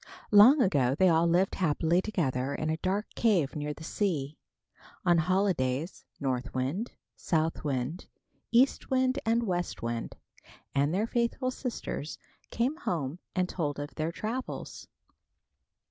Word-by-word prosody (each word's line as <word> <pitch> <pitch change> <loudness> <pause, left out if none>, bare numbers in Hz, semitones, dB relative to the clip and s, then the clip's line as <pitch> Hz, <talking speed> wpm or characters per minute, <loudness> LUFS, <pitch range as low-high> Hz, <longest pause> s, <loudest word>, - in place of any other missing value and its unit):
Long 245 +7 +8
ago, 135 - +2
they 185 +4 +4
all 165 0 +4
lived 180 +3 +2
happily 165 0 +1
together 140 -10 -1
in 155 0 -1
a 160 - -1
dark 195 +5 -1
cave 185 -12 +2
near 150 0 -3
the 155 - -9
sea. 155 -6 -2 0.7
On 175 -2 +5
holidays, 170 -4 0
North 130 -1 -2
Wind, 140 - -1 0.3
South 160 -1 -1
Wind, 140 +4 -3 0.4
East 250 +3 +3
Wind 260 0 +2
and 230 +1 +3
West 175 - -2
Wind 115 0 -3 0.6
and 140 +2 +2
their 200 +5 +1
faithful 240 +2 0
sisters, 235 - -5 0.3
came 255 +7 0
home 165 - -3 0.2
and 185 0 +1
told 150 -6 -2
of 145 0 -6
their 155 +1 -2
travels. 230 +8 -5
170 Hz, 135 wpm, -29 LUFS, 145-210 Hz, 0.7 s, Long